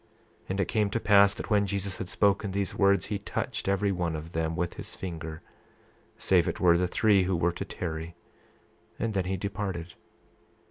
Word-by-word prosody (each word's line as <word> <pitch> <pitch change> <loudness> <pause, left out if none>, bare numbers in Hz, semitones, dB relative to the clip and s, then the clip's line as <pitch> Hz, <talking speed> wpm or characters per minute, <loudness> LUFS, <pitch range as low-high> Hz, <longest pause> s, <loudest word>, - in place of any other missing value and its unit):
28:12 - - -29
And 95 +1 -2
it 95 - +1
came 105 -2 +1
to 115 - -1
pass 100 -2 +5
that - - -7
when 100 -1 +3
Jesus 100 -1 -2
had 90 - -5
spoken 100 0 +2
these 100 -1 -2
words, 100 -2 +3
he 105 -1 -3
touched 110 +2 -4
every 100 +1 +2
one 85 -3 -1
of 80 +2 -7
them 80 0 -1
with 90 0 -2
his - - -8
finger 80 -3 -6 0.7
save 90 -3 +3
it - - -2
were 85 -2 +5
the 90 +1 +2
three 100 -2 +3
who 95 0 0
were 85 +1 +2
to 95 - -5
tarry, 85 -2 -5 0.8
and 115 -2 -2
then 95 -2 0
he 95 +1 -1
departed. 95 -3 -4
95 Hz, 195 wpm, -28 LUFS, 85-100 Hz, 0.8 s, pass